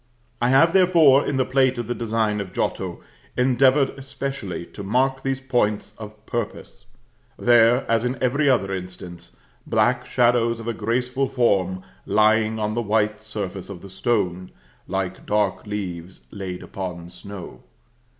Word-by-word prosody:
I 120 - +3
have, 140 +6 +5
therefore, 170 -7 +6
in 140 - 0
the 130 - +2
plate 130 0 +2
of 120 - -3
the 120 - -2
design 110 -2 -1
of 95 -2 -8
Giotto, - - -3 0.3
endeavored 130 +2 +4
especially 135 -9 -5
to 100 - -10
mark 130 +6 +1
these 135 -1 -1
points 110 -6 -1
of 105 0 -11
purpose; 120 -3 -5 0.5
there, 120 +1 +4
as 115 0 +2
in 125 +2 -1
every 140 +3 +2
other 95 -7 +2
instance, 90 -2 -8 0.3
black 125 +1 +1
shadows 120 -2 +2
of 115 - -8
a 115 - 0
graceful 125 +5 -1
form 95 -8 +1 0.2
lying 110 +1 +3
on 105 0 -1
the 120 - -1
white 105 -1 0
surface 100 -4 -6
of 95 -4 -9
the 100 - -10
stone, 95 -5 -1 0.4
like 95 0 -3
dark 105 0 0
leaves 95 -4 -5
laid 95 -3 -6
upon 90 -3 -6
snow. 95 +1 -10
110 Hz, 150 wpm, -23 LUFS, 100-125 Hz, 0.5 s, therefore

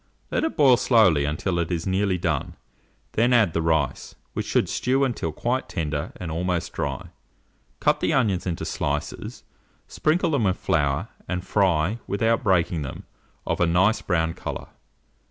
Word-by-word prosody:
Let - - 0
it 320 - -2
boil 135 -5 +6
slowly 100 - +4
until 85 +4 -1
it 85 +1 -2
is 85 -1 -2
nearly 95 0 +1
done; 85 -1 -2 0.6
then 120 +3 +2
add 110 -9 +4
the 85 - 0
rice, 80 -3 0 0.2
which - - -3
should - - +2
stew 130 +2 +1
until 120 -11 -1
quite 125 - -2
tender 75 -4 -3
and 85 -3 -6
almost 90 +1 -2
dry; - - -3 0.7
cut - - +2
the - - +1
onions 105 -9 +1
into 85 -2 -3
slices, 75 +1 -3 0.4
sprinkle 165 +2 +1
them 135 -7 +1
with 95 -1 +1
flour, 70 -3 0 0.2
and 90 +1 -3
fry, 95 +1 +1
without 115 +3 +1
breaking 90 -5 +2
them, 70 - -6 0.4
of - - -1
a 90 - +4
nice 95 +6 +3
brown 80 -3 0
colour. - - -6
90 Hz, 160 wpm, -24 LUFS, 80-115 Hz, 0.7 s, boil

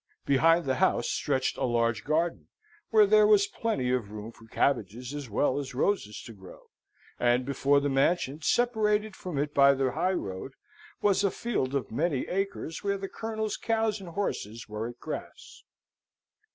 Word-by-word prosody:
Behind 165 +5 +4
the 130 -1 0
house 120 - +2
stretched 135 -2 -1
a - - -2
large 115 -3 +1
garden, 165 +3 -1 0.4
where 430 -1 +6
there 430 +1 +5
was 415 -2 +5
plenty 225 - -2
of 125 -5 -1
room 105 +2 -7
for 115 0 -18
cabbages 120 +1 -1
as 145 -4 -6
well 130 +6 +1
as 135 -3 -6
roses 130 - -1
to 115 - -10
grow; 95 -3 -15 0.5
and 120 +1 +2
before 140 +1 +2
the 140 - -1
mansion, 140 +1 +1
separated 215 0 +1
from 180 -6 -6
it 145 +1 -1
by 140 0 +6
the 135 -1 0
highroad, 135 - -2 0.5
was 200 -1 +3
a 200 - +3
field 175 - -2
of 130 -6 -2
many 145 +2 -1
acres, 195 -4 -3
where 200 0 0
the 195 0 -5
Colonel's 220 -1 -3
cows 220 -2 0
and 185 - -8
horses 120 - -4
were 105 +2 -4
at 120 0 -9
grass. - - -8
140 Hz, 165 wpm, -28 LUFS, 125-200 Hz, 0.5 s, where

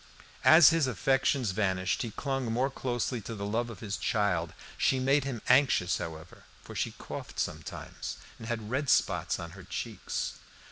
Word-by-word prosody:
As 160 -1 +9
his 165 -4 +2
affections 130 0 +1
vanished, 95 -2 0
he 115 - -2
clung 135 0 -2
more 130 +4 +1
closely 120 -2 -2
to 115 +3 -6
the 100 -1 -4
love 115 +3 -1
of 110 -5 -9
his 100 -3 -3
child. 90 -7 0 0.2
She 130 - +2
made 135 +2 +3
him 125 -5 -4
anxious, 125 -9 +4
however, 80 0 -8 0.2
for - - -10
she - - -2
coughed - - -7
sometimes, - - -5 0.2
and 115 - -8
had 110 -2 -3
red 140 +1 0
spots 85 -2 +2
on 85 -2 -7
her 95 +2 -11
cheeks. - - -4
115 Hz, 170 wpm, -30 LUFS, 95-135 Hz, 0.2 s, As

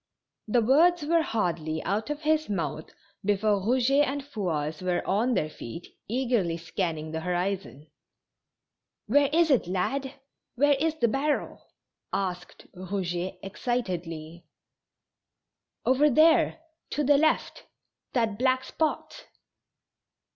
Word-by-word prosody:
The 235 +2 +2
words 320 +7 +4
were 330 +2 +3
hardly 165 - -2
out 210 +7 -1
of 295 0 -3
his 310 -2 +1
mouth 160 -5 -3 0.3
before 205 0 +2
Eou 235 +7 +2
get 280 +2 +4
and 280 +1 -3
Fouasse 160 - -3
were 180 -1 -1
on 230 +6 +1
their 155 -5 +1
feet, 155 +2 -9
eagerly 230 -8 0
scanning 165 -2 -3
the 160 - -3
horizon. 175 - -3 1.2
"Where 280 +5 +3
is 325 0 +3
it, 250 -9 +3
lad? 265 +10 -2 0.4
Where 290 +3 +4
is 320 +1 +1
the 240 -7 +2
barrel?" 280 +6 -1 0.5
asked 180 -2 -4
Eouget, 185 -1 -3
excitedly. 175 -7 -4 1.4
"Over 275 +4 +4
there, 315 +3 +4 0.3
to 295 - -1
the 285 0 +4
left; 315 +1 0 0.5
that 225 -4 0
black 260 0 +2
spot." 320 - -3
215 Hz, 120 wpm, -27 LUFS, 175-280 Hz, 1.4 s, words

